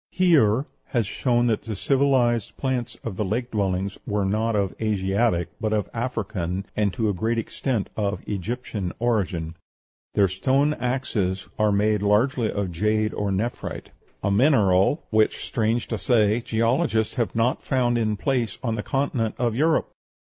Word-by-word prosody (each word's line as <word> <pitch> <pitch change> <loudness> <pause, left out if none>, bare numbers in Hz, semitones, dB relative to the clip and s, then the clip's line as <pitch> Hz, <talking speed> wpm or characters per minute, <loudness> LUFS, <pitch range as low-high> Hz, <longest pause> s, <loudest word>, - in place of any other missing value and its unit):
Heer 140 - +3 0.2
has 120 -5 0
shown 120 +4 +1
that 115 -3 +1
the 110 -2 -5
civilized 125 -2 +1
plants 130 -3 -2
of 105 -5 -5
the - - 0
lake 120 +5 -2
dwellings 95 -2 -1
are 100 -1 +1
not 110 +3 0
of 100 -2 0
Asiatic, 100 -3 +1
but 110 -1 0
of 105 -2 -1
African, 100 -6 -3
and, 105 -2 +1
to 110 - 0
a 105 - +1
great 110 +5 -1
extent, 115 -1 -2
of 105 -1 -2
Egyptian 105 -1 -3
origin. 95 -9 -1 0.6
Their 100 -2 +5
stone 135 +10 +1
axes 115 -9 -2
are 105 -1 +3
made 105 +1 +2
largely 110 +3 +2
of 100 -3 -2
jade 105 +5 0
or 105 -1 -2
nephrite, 105 +5 -3 0.3
"a 100 - +1
mineral 105 - +3
which, 110 -1 +2
strange 115 +1 0
to 110 - -2
say, 110 +2 +3
geologists 115 +1 +1
have 120 -3 -2
not 115 +4 +1
found 125 -3 +1
in 110 -2 0
place 125 -6 -1
on 115 -3 0
the 110 - -2
continent 125 -3 -1
of 120 -2 0
Europe." 155 +7 +1
110 Hz, 155 wpm, -24 LUFS, 100-120 Hz, 0.6 s, Their